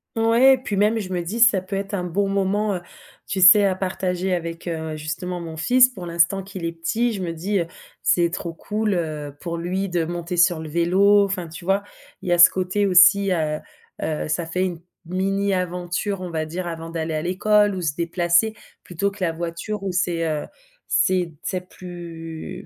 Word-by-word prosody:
Ouais. 230 Hz, +4 st, +5 dB
Et -, -, +2 dB
puis 245 Hz, -5 st, -4 dB
même, 210 Hz, +3 st, +3 dB
je 185 Hz, -2 st, -5 dB
me 175 Hz, -, -1 dB
dis: 195 Hz, +7 st, -4 dB
«Ça 215 Hz, -5 st, +5 dB
peut 190 Hz, +1 st, -6 dB
être 195 Hz, +1 st, -4 dB
un 180 Hz, -3 st, -1 dB
bon 195 Hz, +3 st, -1 dB
moment», 200 Hz, +1 st, 0 dB
heu, 175 Hz, -, -5 dB, 0.5 s
tu 190 Hz, -, -2 dB
sais, 200 Hz, +3 st, +8 dB
à 190 Hz, -1 st, +1 dB
partager 185 Hz, -1 st, -2 dB
avec, 170 Hz, 0 st, -4 dB
heu, 160 Hz, -2 st, -3 dB
justement, 165 Hz, +4 st, -4 dB
mon 165 Hz, -2 st, -7 dB
fils, 250 Hz, +9 st, +5 dB
pour 190 Hz, -8 st, -9 dB
l'instant 170 Hz, +3 st, +2 dB
qu'il 190 Hz, -2 st, -7 dB
est 165 Hz, -, -1 dB
petit. 220 Hz, +9 st, -1 dB
Je 200 Hz, -, -5 dB
me 170 Hz, -2 st, -3 dB
dis: 190 Hz, +5 st, -1 dB
«Heu, 170 Hz, -, -2 dB, 0.3 s
c'est 170 Hz, -1 st, +2 dB
trop 170 Hz, -1 st, -4 dB
cool», 210 Hz, +4 st, -2 dB
heu, 150 Hz, -4 st, -4 dB
pour 170 Hz, -2 st, -4 dB
lui 185 Hz, +3 st, -2 dB
de 175 Hz, -2 st, 0 dB
monter 175 Hz, +1 st, -4 dB
sur 175 Hz, -1 st, +4 dB
le 160 Hz, -1 st, -7 dB
vélo. 190 Hz, +5 st, +4 dB
Enfin, 190 Hz, -3 st, -3 dB
tu 165 Hz, +2 st, -10 dB
vois, 195 Hz, +2 st, +1 dB, 0.4 s
il 180 Hz, -, -5 dB
y -, -, +4 dB
a 175 Hz, -, +3 dB
ce 175 Hz, -, +10 dB
côté 190 Hz, +2 st, 0 dB
aussi, 195 Hz, +2 st, +6 dB
heu 155 Hz, -3 st, 0 dB, 0.4 s
heu, 155 Hz, -1 st, -2 dB
ça 155 Hz, +2 st, -1 dB
fait 180 Hz, +3 st, -1 dB
une 175 Hz, -3 st, -5 dB, 0.2 s
mini-aventure, 185 Hz, 0 st, -1 dB
on 180 Hz, -, -5 dB
va 155 Hz, -1 st, -2 dB
dire, 175 Hz, +3 st, -5 dB
avant 165 Hz, -1 st, -6 dB
d'aller 165 Hz, -1 st, -3 dB
à 155 Hz, -, -1 dB
l'école, 205 Hz, +4 st, +2 dB
où 185 Hz, -, -4 dB
se 155 Hz, -4 st, -1 dB
déplacer, 175 Hz, +5 st, +1 dB, 0.3 s
plutôt 195 Hz, +3 st, -2 dB
que 200 Hz, -2 st, -7 dB
la 165 Hz, -, +1 dB
voiture, 170 Hz, +5 st, -5 dB
où 195 Hz, -, -2 dB
c'est, 175 Hz, -2 st, 0 dB
heu, 155 Hz, -2 st, -2 dB, 0.4 s
c'est 180 Hz, -3 st, +1 dB
c'est 180 Hz, -1 st, -4 dB
plus 165 Hz, -3 st, -8 dB
180 Hz, 205 wpm, -22 LUFS, 170-195 Hz, 0.5 s, ce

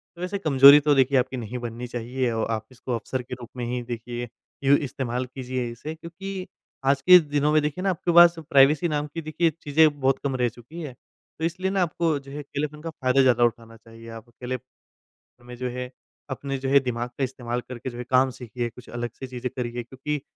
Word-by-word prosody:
तो 170 Hz, -, -11 dB
वैसे 180 Hz, +3 st, -2 dB
कमज़ोरी 140 Hz, -4 st, +8 dB
तो 145 Hz, 0 st, +3 dB
देखिए 135 Hz, 0 st, +4 dB
आपकी 130 Hz, +1 st, 0 dB
नहीं 120 Hz, +1 st, -5 dB
बननी 120 Hz, +1 st, -6 dB
चाहिए 120 Hz, +1 st, -2 dB
औ 110 Hz, -1 st, -1 dB
आप 110 Hz, 0 st, -3 dB
इसको 130 Hz, 0 st, -8 dB
अवसर 130 Hz, +3 st, -3 dB
के 125 Hz, -, -9 dB
रूप 120 Hz, -2 st, -10 dB
में 120 Hz, -, -3 dB
ही 125 Hz, +1 st, -2 dB
देखिए, 120 Hz, 0 st, -5 dB, 0.4 s
इ 135 Hz, -, +1 dB
इस्तेमाल 125 Hz, -2 st, -3 dB
कीजिए 130 Hz, -1 st, -4 dB
इसे, 135 Hz, +7 st, -7 dB
क्योंकि 185 Hz, +4 st, -7 dB, 0.4 s
आज 135 Hz, 0 st, +3 dB
के 180 Hz, +6 st, +9 dB
दिनों 145 Hz, -2 st, 0 dB
में 155 Hz, -, +5 dB
देखिए 150 Hz, +4 st, -3 dB
ना 195 Hz, -, +2 dB
आपके 175 Hz, -1 st, -1 dB
पास 175 Hz, 0 st, +8 dB
प्राइवेसी 140 Hz, +4 st, +5 dB
नाम 150 Hz, -2 st, -1 dB
की 165 Hz, -, -4 dB
देखिए 160 Hz, +2 st, +1 dB
चीज़ें 150 Hz, 0 st, +4 dB
बहुत 135 Hz, 0 st, +2 dB
कम 140 Hz, -2 st, -1 dB
रह 125 Hz, -1 st, +1 dB
चुकी 125 Hz, +9 st, -11 dB
है। 145 Hz, -5 st, -6 dB, 0.5 s
तो 160 Hz, -, 0 dB
इसलिए 185 Hz, +3 st, -1 dB
ना 195 Hz, -1 st, +1 dB
आपको 165 Hz, -2 st, +1 dB
जो 140 Hz, 0 st, -13 dB
है 145 Hz, -, -6 dB
अकेलेपन 150 Hz, +1 st, -5 dB
का 165 Hz, -, -5 dB
फायदा 135 Hz, -3 st, +2 dB
ज़्यादा 125 Hz, -2 st, +4 dB
उठाना 115 Hz, -1 st, -1 dB
चाहिए। 115 Hz, +1 st, -14 dB
आप 115 Hz, +1 st, -10 dB
अकेले 125 Hz, +2 st, -5 dB, 0.9 s
में 125 Hz, 0 st, -9 dB
जो 125 Hz, +1 st, -3 dB
है 125 Hz, +1 st, -5 dB, 0.4 s
अपने 135 Hz, +1 st, -4 dB
जो 135 Hz, 0 st, -3 dB
है 140 Hz, +1 st, +6 dB
दिमाग 125 Hz, -2 st, -3 dB
का 140 Hz, -, -1 dB
इस्तेमाल 125 Hz, -2 st, -3 dB
करके 125 Hz, 0 st, -5 dB
जो 120 Hz, -, -10 dB
है 125 Hz, -, -4 dB
काम 130 Hz, +1 st, +4 dB
सीखिए, 120 Hz, -1 st, -5 dB
कुछ 120 Hz, +1 st, -15 dB
अलग 120 Hz, 0 st, -4 dB
सी 130 Hz, -, -8 dB
चीज़ें 125 Hz, 0 st, -4 dB
करिए, 120 Hz, -1 st, -3 dB
क्योंकि 135 Hz, +4 st, -4 dB
130 Hz, 220 wpm, -25 LUFS, 120-150 Hz, 0.9 s, के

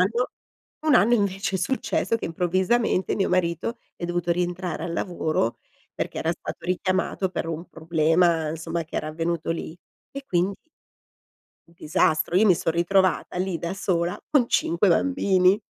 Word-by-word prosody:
anno 230 Hz, +7 st, +1 dB, 0.6 s
un 305 Hz, -, +5 dB
anno 235 Hz, 0 st, +5 dB
invece 195 Hz, -2 st, 0 dB
è -, -, -4 dB
successo 230 Hz, +3 st, 0 dB
che -, -, -5 dB
improvvisamente 185 Hz, +5 st, +1 dB
mio 195 Hz, -, 0 dB
marito 180 Hz, +6 st, 0 dB, 0.2 s
è -, -, -6 dB
dovuto 175 Hz, 0 st, 0 dB
rientrare 175 Hz, 0 st, -2 dB
al 170 Hz, -, -4 dB
lavoro 160 Hz, -, -1 dB, 0.4 s
perché -, -, -4 dB
era 160 Hz, -, 0 dB
stato -, -, -8 dB
richiamato 185 Hz, +1 st, 0 dB
per 180 Hz, -, -3 dB
un 165 Hz, +2 st, -5 dB
problema 165 Hz, 0 st, +2 dB
insomma 165 Hz, +1 st, -3 dB
che 155 Hz, -, -8 dB
era 155 Hz, -, -2 dB
avvenuto 165 Hz, +1 st, -2 dB
lì 165 Hz, 0 st, -4 dB, 0.3 s
e 275 Hz, 0 st, -7 dB
quindi 185 Hz, +2 st, 0 dB, 1.1 s
un 170 Hz, -, -22 dB
disastro 155 Hz, +1 st, +1 dB
io 215 Hz, +4 st, +5 dB
mi 185 Hz, -4 st, +5 dB
son 165 Hz, -, -1 dB
ritrovata 180 Hz, +1 st, +1 dB
lì 185 Hz, -1 st, -1 dB
da 170 Hz, +2 st, -3 dB
sola 175 Hz, -2 st, -1 dB
con 265 Hz, -6 st, +3 dB
5 170 Hz, +4 st, +2 dB
bambini. 185 Hz, -, +3 dB
175 Hz, 155 wpm, -25 LUFS, 165-190 Hz, 1.1 s, un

